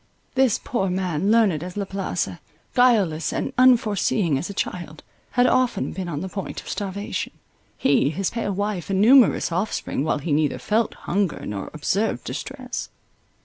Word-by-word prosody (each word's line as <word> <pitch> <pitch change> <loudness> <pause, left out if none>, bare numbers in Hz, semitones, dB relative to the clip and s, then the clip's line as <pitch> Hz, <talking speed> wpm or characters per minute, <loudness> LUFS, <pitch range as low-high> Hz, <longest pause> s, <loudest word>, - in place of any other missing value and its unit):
This 265 -4 +3
poor 195 -6 -1
man, 180 -1 -1
learned 215 -9 +4
as 180 +2 -7
La 200 - -1
Place, 195 0 -2 0.5
guileless 210 -11 +3
and - - -2
unforeseeing 215 - +3
as 135 - -2
a - - -5
child, 170 -5 -4 0.3
had 245 0 +4
often 255 -5 +2
been 185 -2 -5
on 150 -2 -3
the 190 - -3
point 195 +1 -5
of - - -12
starvation, 200 0 -4 0.4
he, 140 0 +3
his 185 +5 -2
pale 230 -3 -2
wife 200 -2 -2
and 190 -1 +1
numerous 240 -3 +5
offspring, 180 -6 -1
while 155 - +1
he 150 +2 -4
neither 150 0 +2
felt 220 +1 0
hunger, 195 -2 -1
nor 100 -2 -5
observed 195 +8 -1
distress. - - -5
195 Hz, 160 wpm, -23 LUFS, 170-220 Hz, 0.5 s, numerous